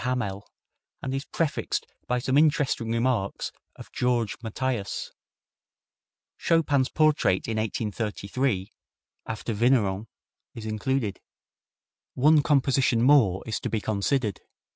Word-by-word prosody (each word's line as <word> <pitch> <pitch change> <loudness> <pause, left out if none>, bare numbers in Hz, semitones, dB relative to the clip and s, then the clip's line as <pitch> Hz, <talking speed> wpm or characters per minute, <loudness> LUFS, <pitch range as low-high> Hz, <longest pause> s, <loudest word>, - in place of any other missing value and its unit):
Hamelle, 115 -6 -2 0.6
and 130 - -2
is 135 +2 -3
prefixed 165 -3 -1 0.2
by 125 - +1
some 130 +2 0
interesting 145 -6 +2
remarks 115 -4 0 0.2
of - - -12
Georges 120 -4 0
Mathias. 115 -2 -3 1.3
Chopin's 145 -5 +2
portrait 155 -11 +2
in 110 -1 -2
1833, 110 0 -2 0.6
after 110 +1 -3
Vigneron, 110 -3 +2 0.5
is 115 - -7
included. 110 -1 -1 1.0
One 150 +3 +5
composition 135 -5 +2
more 125 -9 +4
is 110 - -2
to - - -3
be 110 - 0
considered. 105 +2 -1
120 Hz, 105 wpm, -26 LUFS, 105-135 Hz, 1.3 s, One